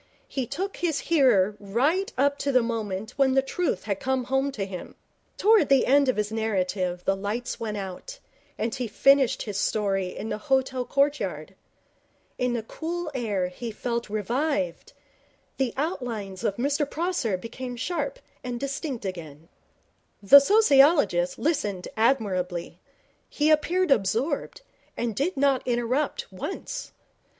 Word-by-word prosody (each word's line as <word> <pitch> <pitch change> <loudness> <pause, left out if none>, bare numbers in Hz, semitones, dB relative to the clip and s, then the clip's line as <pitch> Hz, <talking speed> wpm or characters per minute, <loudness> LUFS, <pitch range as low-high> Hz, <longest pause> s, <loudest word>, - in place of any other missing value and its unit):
He 260 -3 -3
took 380 - -4
his 330 -4 0
hearer 240 - +3
right 275 - 0
up 280 +2 +2
to 280 - 0
the 255 -2 +4
moment 220 -3 -3
when 265 -2 +3
the 270 - +4
truth 345 +6 -2
had 200 -2 -2
come 260 -1 0
home 270 +2 0
to 200 -6 -3
him. 185 -2 -8 0.4
Towards 420 -8 +4
the 275 -2 +5
end 280 0 +4
of 255 - +2
his 210 0 -1
narrative 185 -5 -1
the 195 - +2
lights 210 +6 -4
went 215 -2 -3
out, 195 - -7 0.4
and 220 +2 -2
he 255 -3 -3
finished 275 +4 +3
his 205 -2 -4
story 195 -4 0
in 220 - -5
the - - -3
hotel 260 +1 0
courtyard. 200 - 0 0.9
In 250 -1 +1
the 235 -2 -2
cool 330 +6 -5
air 205 -8 -1
he 230 +6 -6
felt 235 +1 -3
revived. 235 - -2 0.6
The 265 -3 0
outlines 230 - -3
of 200 - 0
Mr 285 +4 0
Prosser 320 - -1
became 245 +5 -7
sharp 285 +1 -3 0.3
and 245 -1 -4
distinct 275 -3 -4
again. 165 -4 -7 0.7
The 240 +9 +10
sociologist 280 - +4
listened 240 - -1
admirably. 195 -7 0 0.5
He 300 +1 +2
appeared 340 +3 +2
absorbed, 245 - 0 0.4
and 230 -3 -2
did 295 - -1
not 275 -1 +3
interrupt 255 - -1
once. - - -6
245 Hz, 140 wpm, -26 LUFS, 205-280 Hz, 0.9 s, The